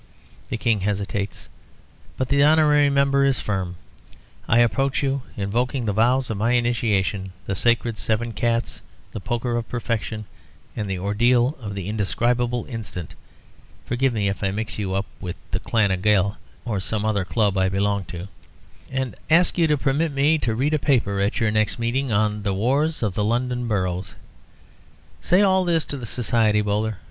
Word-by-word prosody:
The - - -2
King 115 -2 +1
hesitates, 100 0 -3 0.7
but 130 - -2
the 140 +1 +3
honorary 150 -1 +5
member 140 0 +3
is 135 -1 +2
firm. 95 -3 -3 0.7
I 115 - +4
approach 135 +4 +2
you 135 0 0 0.2
invoking 120 +5 -1
the 105 - 0
vows 120 +4 +2
of 110 - -3
my 115 +4 +1
initiation, 105 -6 0
the 95 - -2
Sacred 115 +2 +1
Seven 115 +1 -1
Cats, 115 +2 -1 0.3
the - - -5
Poker 120 +3 -2
of 120 -1 -3
Perfection, 110 -2 -3 0.5
and 105 -3 -3
the 95 - -2
Ordeal 120 - +2
of 100 -3 -5
the 95 -2 -5
Indescribable 120 +3 0
Instant 110 - -6 0.7
(forgive 130 +2 +1
me 105 -4 0
if 100 0 -3
I 100 - +2
mix 105 +2 -4
you 95 -2 -2
up 100 +1 0
with 90 -2 -5 0.2
the - - -1
Clan 110 -4 +1
na 95 - +1
Gael 100 0 +2 0.3
or 110 -5 -1
some 105 +2 -1
other 105 -3 +1
club 105 +1 +1
I 95 0 +2
belong 100 0 0
to), 85 +3 -7 0.6
and 130 -2 -2 0.2
ask 170 +3 +4
you 170 -2 +3
to 150 -1 +2
permit 145 +4 0
me 145 +3 +3
to 115 -5 -1
read 140 +6 0
a 155 - +2
paper 120 -9 +1
at 100 +2 0
your 115 -3 +2
next 110 -1 +1
meeting 120 +3 -1
on 105 0 +1
the 100 -2 -1
"Wars 140 +8 +1
of 105 -4 0
the 105 - -1
London 120 +2 -1
Boroughs."' 95 -4 -2 1.1
Say 180 - +4
all 190 -1 +4
this 165 -3 +1
to 140 - -5
the 120 -3 -6
Society, 110 -2 +2
Bowler. 105 0 -1
115 Hz, 175 wpm, -23 LUFS, 100-130 Hz, 1.1 s, honorary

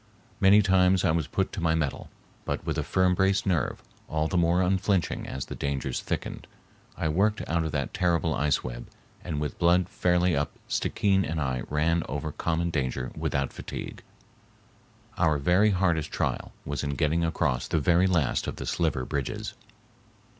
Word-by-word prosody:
Many 100 +2 +6
times 95 -1 +4
I 90 - +4
was 80 -2 0
put 95 - -1
to 95 - -5
my 80 -1 +2
mettle, 75 -4 -2 0.3
but - - -3
with - - -1
a - - 0
firm 95 -1 +2
braced 95 +2 +2
nerve, 85 -9 0 0.3
all 80 0 0
the 90 - -4
more 85 +1 +3
unflinching 95 -1 0
as 65 - -4
the - - -7
dangers 70 -2 -2
thickened, - - -4 0.5
I - - -1
worked 100 +7 +1
out 85 +1 +1
of 80 - -3
that 70 -4 -2
terrible 85 -2 +1
ice 75 -1 +1
web, - - -6 0.4
and 80 -4 -3
with 75 -2 -4
blood 85 +1 +4
fairly 90 -1 +2
up 70 0 -1
Stickeen 95 -2 +1
and 80 -1 -2
I 65 -4 -1
ran 80 +3 +1
over 75 +2 -3
common 85 +2 -1
danger 65 -4 -2
without 70 -1 -1
fatigue. - - -7 1.2
Our 80 -4 +3
very 90 +9 +3
hardest 90 -5 +1
trial - - -2
was 75 +1 -3
in 70 -1 -2
getting 80 +2 +1
across 65 -6 0
the - - 0
very 85 +4 +3
last 80 -9 +1
of - - -3
the - - -6
sliver 75 -7 0
bridges. 70 -2 -3
85 Hz, 175 wpm, -27 LUFS, 75-90 Hz, 1.2 s, Many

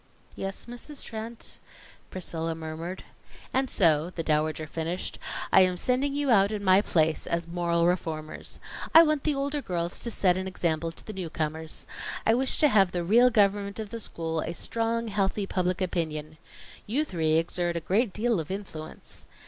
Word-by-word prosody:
"Yes, 195 0 -5
Mrs. 245 +4 -6
Trent," 225 +1 -7 0.5
Priscilla 165 -3 -3
murmured. 165 +3 -6 0.5
"And 265 0 +1
so," 160 -3 +3
the 170 -2 -4
Dowager 155 0 0
finished, 165 +4 -3 0.3
"I 190 - +8
am 185 -1 +3
sending 265 +6 +1
you 285 -2 +1
out 200 -2 +5
in 210 -1 -3
my 190 0 +6
place, 160 -5 +1
as 170 0 -1
moral 170 -1 +1
reformers. 160 -3 -2 0.4
I 325 - +11
want 305 -3 +1
the 300 -2 +2
older 280 +1 -1
girls 175 -6 -2
to 235 - -3
set 185 -5 +2
an 190 0 -3
example 165 -3 -1
to - - -10
the 215 - -6
newcomers. 160 -3 -4 0.4
I 225 - +5
wish 260 +3 +2
to 300 - +7
have 195 -8 +4
the 175 -1 -1
real 235 +8 +6
government 200 -2 +2
of 215 -2 -5
the 230 - -4
school 165 -5 -3
a 170 - -4
strong, 230 +4 0
healthy 200 0 0
Public 185 0 -1
Opinion. 155 -4 -2 0.5
You 275 +9 +1
three 160 - 0
exert 175 +1 0
a - - 0
great 200 +7 +1
deal 220 0 +1
of 155 - -5
influence. 185 -5 -7
185 Hz, 175 wpm, -27 LUFS, 165-225 Hz, 0.5 s, I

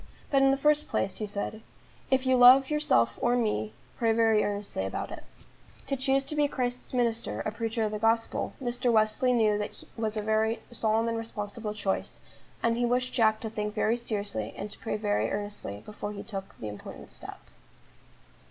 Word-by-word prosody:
"But 275 -1 +4
in 270 - +6
the 270 - +3
first 300 +1 +3
place," 190 -1 -1
he 215 - -3
said, 205 +2 -4 0.5
"if 265 0 +2
you 260 0 +4
love 255 +3 +8
yourself 120 - +2
or 240 0 +3
me, 110 - 0 0.3
pray 230 -2 +3
very 225 -1 +4
earnestly 205 - -2
about 95 - -4
it." - - -7 0.6
To 275 - -1
choose 270 +1 +1
to 305 - -4
be 295 -1 +3
Christ's 250 -2 -3
minister, 235 -2 0
a 215 - -2
preacher 225 +1 -2
of 215 - 0
the 210 - -3
gospel, 225 +1 +1
Mr. 245 -1 0
Wesley 220 +3 +3
knew 215 -3 +3 0.3
was 220 -1 -2
a 210 - -1
very 220 +1 +1
solemn 225 -1 +1
and 230 0 -1
responsible 215 -1 -5
choice, 195 -2 -2 0.4
and 230 0 +2
he 245 - +1
wished 250 +1 +1
Jack 220 -2 +3
to 220 - -3
think 210 -1 -3
very 220 +1 +2
seriously, 205 - -3
and 205 +1 -5
to - - -9
pray 220 - -2
very 205 -1 0
earnestly 205 - -5
before 210 0 -6
he 200 - -7
took 195 -3 -7
the 110 - -6
important 105 -1 -9
step. - - -9
225 Hz, 190 wpm, -29 LUFS, 210-245 Hz, 0.6 s, love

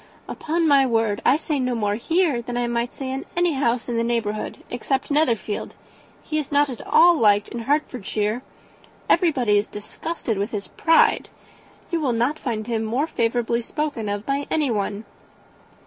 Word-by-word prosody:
"Upon 330 +1 -1
my 280 -2 +6
word 225 -5 +1
I 280 - +4
say 305 -2 -2
no 250 -1 0
more 205 -3 0
here 310 - +1
than 240 +1 -5
I 245 - +1
might 235 0 -1
say 265 -1 -5
in 270 +1 -3
any 350 -2 +3
house 245 -4 0
in 240 -2 -2
the 230 - +1
neighbourhood, 225 -3 -2
except 265 +3 -2
Netherfield. 240 -8 0 0.5
He 310 - -1
is 300 - -5
not 290 -1 +3
at 240 - -7
all 345 0 +6
liked 205 -1 +4
in 235 - -5
Hertfordshire. 230 -4 -1 0.7
Everybody 255 - +3
is 205 - -3
disgusted 220 +2 -4
with 200 +2 -1
his 205 -4 -4
pride. 325 0 +3 0.6
You 335 -2 0
will 265 -5 +1
not 245 +7 0
find 220 -4 -3
him 225 -1 -1
more 240 +7 0
favourably 235 -4 0
spoken 265 -4 -3
of 205 +1 -3
by 280 +1 -1
anyone." 215 -8 -1
240 Hz, 170 wpm, -23 LUFS, 220-290 Hz, 0.7 s, my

